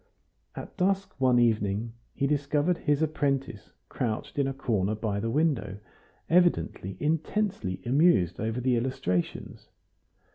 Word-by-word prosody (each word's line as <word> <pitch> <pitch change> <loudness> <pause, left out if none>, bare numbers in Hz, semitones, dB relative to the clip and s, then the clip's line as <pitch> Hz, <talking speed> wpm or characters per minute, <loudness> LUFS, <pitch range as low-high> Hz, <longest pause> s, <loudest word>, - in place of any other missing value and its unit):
At - - -9
dusk 195 0 0
one 130 -2 +4
evening 110 -1 +1 0.2
he 140 - 0
discovered 145 +4 +1
his 145 +1 +1
apprentice 140 -8 -2 0.2
crouched 120 +3 -3
in 140 - +2
a - - -1
corner 110 -6 -1
by 105 -2 -2
the 115 +2 -2
window, 130 - 0 0.5
evidently 95 - +1
intensely 160 - -1
amused 125 - +3
over 110 +3 -2
the 125 0 +1
illustrations. 105 -8 -3
130 Hz, 120 wpm, -28 LUFS, 105-150 Hz, 0.5 s, one